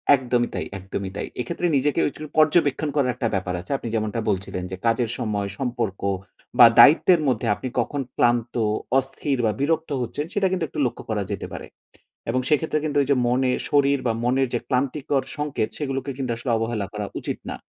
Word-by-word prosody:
একদমই 125 Hz, -2 st, 0 dB
তাই, -, -, -3 dB
একদমই 95 Hz, 0 st, -5 dB
তাই। -, -, -3 dB
এক্ষেত্রে 170 Hz, +8 st, -1 dB
নিজেকে 140 Hz, +2 st, +1 dB
উচু 145 Hz, -, -14 dB, 0.2 s
পর্যবেক্ষণ 155 Hz, -1 st, +3 dB
করার 135 Hz, -4 st, +2 dB
একটা 120 Hz, -, -1 dB
ব্যাপার 90 Hz, -1 st, -2 dB
আছে। 90 Hz, -, -10 dB
আপনি 120 Hz, -, -7 dB
যেমনটা 110 Hz, +1 st, -1 dB
বলছিলেন 95 Hz, -2 st, -2 dB
যে, -, -, -3 dB
কাজের 115 Hz, 0 st, +2 dB
সময় 105 Hz, -4 st, -2 dB
সম্পর্ক 120 Hz, -6 st, -2 dB, 0.6 s
বা 120 Hz, -, +12 dB
দায়িত্বের 165 Hz, +2 st, +7 dB
মধ্যে 120 Hz, -3 st, 0 dB
আপনি 105 Hz, +6 st, -6 dB
কখন 145 Hz, -1 st, -1 dB
ক্লান্ত, 120 Hz, 0 st, +2 dB, 0.4 s
অস্থির, 135 Hz, +1 st, -1 dB
বা 110 Hz, -, +3 dB
বিরক্ত 160 Hz, +3 st, 0 dB
হচ্ছেন 145 Hz, +5 st, -3 dB
সেটা 200 Hz, -2 st, +2 dB
কিন্তু 185 Hz, -2 st, -1 dB
একটু 155 Hz, -, -6 dB
লক্ষ্য 120 Hz, -, -3 dB
করা 105 Hz, -2 st, 0 dB
যেতে 100 Hz, -, -4 dB
পারে। -, -, -7 dB, 0.6 s
এবং 125 Hz, +2 st, +1 dB
সেক্ষেত্রে 155 Hz, 0 st, +1 dB
কিন্তু 145 Hz, -1 st, -1 dB
এই -, -, -6 dB
যে -, -, +5 dB
মনে, 125 Hz, +1 st, +2 dB, 0.2 s
শরীর 140 Hz, -1 st, +3 dB
বা 115 Hz, -, +2 dB
মনের 130 Hz, +2 st, +2 dB
যে 120 Hz, -, +1 dB
ক্লান্তিকর 135 Hz, +1 st, 0 dB
সংকেত, 145 Hz, -6 st, -1 dB
সেগুলোকেও 135 Hz, -1 st, -3 dB
কিন্তু 130 Hz, -3 st, -2 dB
আসলে 120 Hz, +1 st, -3 dB
অবহেলা 115 Hz, -2 st, -2 dB
করা 105 Hz, -1 st, -3 dB
উচিত -, -, -4 dB
না। -, -, -4 dB
130 Hz, 185 wpm, -23 LUFS, 115-145 Hz, 0.6 s, বা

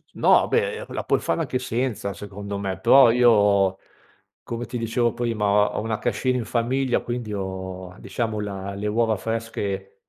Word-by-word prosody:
no, -, -, +4 dB
beh, 465 Hz, 0 st, 0 dB
la -, -, -4 dB
puoi -, -, +1 dB
fare -, -, -1 dB
anche 135 Hz, -5 st, -1 dB
senza 120 Hz, -5 st, -2 dB
secondo 100 Hz, 0 st, -7 dB
me, 95 Hz, -2 st, -4 dB
però 130 Hz, +4 st, +7 dB
io, 105 Hz, -5 st, +4 dB, 0.7 s
come 120 Hz, 0 st, -5 dB
ti 120 Hz, +2 st, -5 dB
dicevo 115 Hz, 0 st, 0 dB
prima, 115 Hz, -3 st, -1 dB
ho 105 Hz, 0 st, +4 dB
ho -, -, 0 dB
una 110 Hz, -1 st, -2 dB
cascina 130 Hz, -1 st, 0 dB
in 120 Hz, -, -2 dB
famiglia, 125 Hz, +2 st, 0 dB
quindi 120 Hz, -3 st, -4 dB
ho, 95 Hz, -2 st, -5 dB
diciamo 110 Hz, -3 st, -3 dB
la 100 Hz, -1 st, -5 dB
le 105 Hz, +1 st, -3 dB
uova 110 Hz, +1 st, +1 dB
fresche 100 Hz, -3 st, -4 dB
110 Hz, 165 wpm, -24 LUFS, 100-120 Hz, 0.7 s, però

